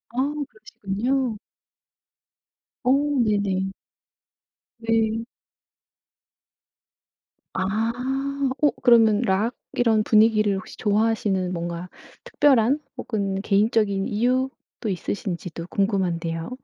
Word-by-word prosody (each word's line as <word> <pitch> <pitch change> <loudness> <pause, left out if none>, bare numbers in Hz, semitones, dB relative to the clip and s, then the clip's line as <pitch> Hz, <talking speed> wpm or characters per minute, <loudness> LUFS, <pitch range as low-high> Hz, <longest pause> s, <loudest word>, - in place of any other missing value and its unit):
아. 275 +3 0 0.2
그러시군요. 225 +4 -2 1.5
어. 250 - +1 0.3
네네. 200 -3 0 1.1
네. 225 0 0 2.3
아. 210 +5 0 0.7
어 295 - +6
그러면 225 -4 +5
록 220 +1 +1 0.2
이런 225 -3 +3
분위기를 215 -2 +4
혹시 215 +3 -8
좋아하시는 205 -3 +1
뭔가 170 +1 -4 0.3
특별한 275 -1 +3 0.2
혹은 195 -3 -2
개인적인 205 -1 +2
이유도 250 +1 -2
있으신지도 180 -3 -4
궁금한데요. 175 -5 -1
215 Hz, 190 characters per minute, -24 LUFS, 195-230 Hz, 2.3 s, 어